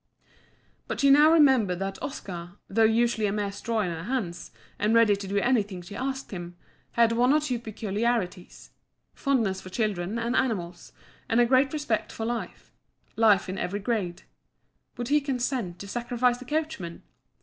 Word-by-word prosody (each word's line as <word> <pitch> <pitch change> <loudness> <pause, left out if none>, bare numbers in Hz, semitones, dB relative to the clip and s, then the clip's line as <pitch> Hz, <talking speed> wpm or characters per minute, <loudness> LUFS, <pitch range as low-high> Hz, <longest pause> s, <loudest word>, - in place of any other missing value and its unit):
But - - -4
she 280 -1 +5
now 300 +3 +7
remembered 265 - +4
that 195 +1 -4
Oscar, 175 -9 -6
though 225 +3 +2
usually 225 -1 +2
a - - -1
mere 205 -1 -2
straw 220 +2 -2
in 180 -4 -1
her 165 +1 -6
hands, 210 -9 -3 0.3
and 215 +2 +2
ready 225 -3 +5
to 200 -1 -7
do 200 +1 -1
anything 205 -5 +1
she 190 +4 -10
asked 265 +2 -4
him, 175 -2 -7 0.4
had 235 -1 +4
one 245 +3 +3
or 300 - +5
two 255 -6 -2
peculiarities 215 -3 -3 0.4
fondness 225 -9 0
for 185 - -10
children 200 -1 -2
and 235 +2 -1
animals, 180 -10 -2 0.4
and 230 - +3
a 240 - +6
great 260 +2 +3
respect 290 -8 -2
for 225 - -5
life 235 0 -5 0.4
life 215 -4 +4
in 190 +1 -4
every 200 +3 -2
grade. 205 -5 -2 0.7
Would 240 0 -4
he 295 +1 +4
consent 250 - -2
to 200 - -8
sacrifice 240 +2 0
the 255 - -10
coachman? 295 - -3
225 Hz, 170 wpm, -27 LUFS, 195-250 Hz, 0.7 s, now